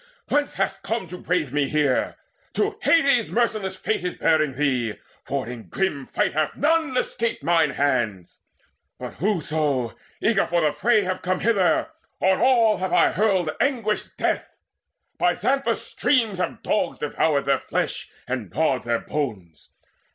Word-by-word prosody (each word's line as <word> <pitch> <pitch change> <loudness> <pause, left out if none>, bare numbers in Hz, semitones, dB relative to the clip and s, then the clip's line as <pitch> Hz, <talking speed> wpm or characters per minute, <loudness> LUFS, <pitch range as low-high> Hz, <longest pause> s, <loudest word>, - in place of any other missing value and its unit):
Whence 290 0 +1
hast 195 0 -1
come 225 -2 -2
to 180 - -7
brave 165 -7 -1
me 145 -2 +1
here? 150 -4 +1 0.4
To 415 0 0
Hades 275 -8 +3
merciless 215 -5 0
Fate 215 - -1
is 180 - -2
bearing 155 -3 +2
thee; 130 -5 0 0.3
For - - -2
in 120 -2 -8
grim 150 -9 -2
fight - - 0
hath 155 0 0
none 315 -3 +1
escaped 230 - -1
mine 165 -1 +3
hands; 120 -10 -1 0.6
But - - -7
whoso, 155 - 0 0.2
eager 210 -3 +2
for 170 0 +1
the 150 -2 +2
fray, 230 -3 +3
have 185 0 -3
come 185 0 -1
Hither, 220 - +2 0.3
on 190 0 +3
all 235 -4 +4
have 185 +1 -3
I - - +4
hurled 190 -6 +1
anguished 230 -6 -1
death. - - -1 0.6
By - - +3
Xanthus' 275 +1 0
streams 225 -9 +1
have 180 - -3
dogs 210 - 0
devoured 145 -1 0
their 140 - +2
flesh - - -3 0.2
And 125 -6 -3
gnawed 140 - +1
their 120 -1 0
bones. 100 - -5
180 Hz, 150 wpm, -24 LUFS, 140-220 Hz, 0.6 s, all